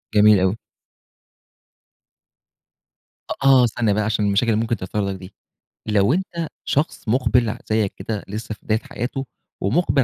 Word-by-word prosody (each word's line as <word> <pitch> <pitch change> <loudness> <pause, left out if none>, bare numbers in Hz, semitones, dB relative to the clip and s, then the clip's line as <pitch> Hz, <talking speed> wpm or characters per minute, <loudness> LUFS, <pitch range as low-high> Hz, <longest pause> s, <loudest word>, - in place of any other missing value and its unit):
جميل 105 -1 +7
أوي. 95 +3 +1 2.7
أ - - 0
آه 135 -2 +7
استنى 115 -2 +1
بقى، 105 +1 +1
عشان 105 0 0
المشاكل 100 +3 +2
اللي 110 +1 +1
ممكن 115 +1 0
تحصل 100 +2 -2
لك 100 - -2
دي، 95 +1 -11 0.5
لو 105 +3 +3
أنت 170 -2 -2 0.2
شخص 145 -3 -1
مُقبِل 120 0 +2
ع - - -4
زيك 110 -2 +1
كده 105 +2 -4
لسه 110 +2 -5
في - - -29
بداية 110 0 +1
حياته، 130 +4 -5 0.4
ومُقبِل 140 - +2
110 Hz, 150 wpm, -22 LUFS, 100-125 Hz, 2.7 s, جميل